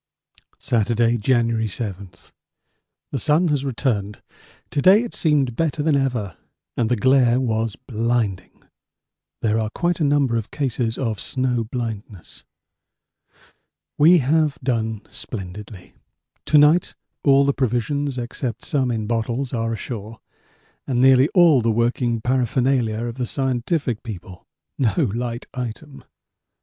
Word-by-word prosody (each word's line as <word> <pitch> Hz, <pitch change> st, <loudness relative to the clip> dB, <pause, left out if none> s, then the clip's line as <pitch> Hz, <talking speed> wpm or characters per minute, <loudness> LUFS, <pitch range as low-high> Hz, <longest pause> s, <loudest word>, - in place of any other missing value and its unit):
Saturday, 120 Hz, -2 st, +1 dB
January 115 Hz, -1 st, +1 dB
7. 100 Hz, -2 st, -5 dB, 1.0 s
The 135 Hz, -, -2 dB
sun 155 Hz, +8 st, +2 dB
has 145 Hz, -2 st, 0 dB
returned. 115 Hz, -6 st, -2 dB, 0.5 s
To 145 Hz, -, 0 dB
day 195 Hz, +7 st, +6 dB
it 240 Hz, -, -7 dB
seemed 140 Hz, -7 st, +1 dB
better 155 Hz, -1 st, -1 dB
than 155 Hz, -1 st, +2 dB
ever 120 Hz, -, -1 dB, 0.4 s
and 115 Hz, -2 st, 0 dB
the 125 Hz, -, +2 dB
glare 125 Hz, +1 st, +3 dB
was 115 Hz, -4 st, -1 dB
blinding. 115 Hz, -5 st, -2 dB, 0.8 s
There 110 Hz, 0 st, +2 dB
are 110 Hz, -1 st, -1 dB
quite 175 Hz, +9 st, -1 dB
a -, -, +1 dB
number 140 Hz, -5 st, +2 dB
of 110 Hz, -1 st, -4 dB
cases 125 Hz, -5 st, -2 dB
of 115 Hz, -5 st, -2 dB
snow 125 Hz, -3 st, -1 dB
blindness. 110 Hz, -5 st, -6 dB, 1.5 s
We 165 Hz, +5 st, +6 dB
have 150 Hz, +1 st, +1 dB
done 110 Hz, -4 st, -1 dB
splendidly. 100 Hz, -2 st, -8 dB, 0.5 s
To 150 Hz, -, +4 dB
night 150 Hz, +4 st, +4 dB, 0.3 s
all 140 Hz, -1 st, +5 dB
the 140 Hz, -, +2 dB
provisions 135 Hz, +2 st, -1 dB
except 120 Hz, -1 st, -4 dB
some 135 Hz, -3 st, 0 dB
in 110 Hz, -3 st, -2 dB
bottles 120 Hz, +4 st, -2 dB
are 115 Hz, -1 st, -1 dB
ashore 110 Hz, 0 st, -6 dB, 0.7 s
and 125 Hz, -3 st, 0 dB
nearly 130 Hz, +2 st, +5 dB
all 165 Hz, -8 st, +6 dB
the 115 Hz, -, +1 dB
working 115 Hz, 0 st, 0 dB
paraphernalia 125 Hz, -2 st, +1 dB
of 120 Hz, +1 st, -5 dB
the 125 Hz, -, -1 dB
scientific 130 Hz, -1 st, -1 dB
people 95 Hz, -5 st, -9 dB, 0.3 s
no 120 Hz, -6 st, +1 dB, 0.2 s
light 120 Hz, 0 st, -4 dB
item. 130 Hz, +3 st, -7 dB
120 Hz, 130 wpm, -22 LUFS, 115-140 Hz, 1.5 s, day